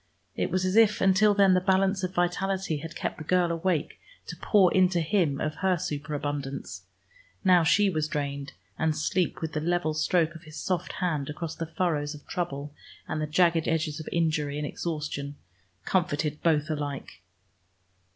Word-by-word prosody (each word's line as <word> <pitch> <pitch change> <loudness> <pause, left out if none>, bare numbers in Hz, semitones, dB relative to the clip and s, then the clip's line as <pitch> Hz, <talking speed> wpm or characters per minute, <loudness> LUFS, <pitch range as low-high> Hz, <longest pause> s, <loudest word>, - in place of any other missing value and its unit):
It - - -1
was 185 0 0
as 185 +1 0
if 220 -2 +5
until 195 +2 +4
then 195 -2 +5
the 180 - +3
balance 190 +1 +2
of 185 +1 -3
vitality 180 -1 0
had 155 +2 -8
kept - - -4
the - - -6
girl 175 +1 +2
awake 165 -1 -1 0.3
to - - -7
pour 195 -4 +3
into 185 -1 +3
him 160 -4 +1
of 155 0 -2
her 190 -2 +2
superabundance: 145 -4 -4 0.6
now 180 -3 +5
she 205 +6 +4
was 155 -5 0
drained, 140 -2 -4 0.3
and 160 -1 +1
sleep 175 +3 0
with 160 -1 -3
the 155 - -1
level 175 -1 0
stroke 160 +1 +1
of 165 - -11
his 155 0 -10
soft 180 -2 -2
hand 155 -7 -2
across 160 +2 -5
the 165 - -5
furrows 155 -4 -1
of 145 - -14
trouble 145 -5 -4 0.3
and 155 - -2
the 155 - -1
jagged 165 0 +3
edges 160 -1 -1
of 155 - -6
injury 155 -4 0
and 150 - -2
exhaustion 145 -2 -4 0.5
comforted 155 -5 0
both 155 -1 +2
alike. 145 - -5
165 Hz, 170 wpm, -27 LUFS, 150-185 Hz, 0.6 s, if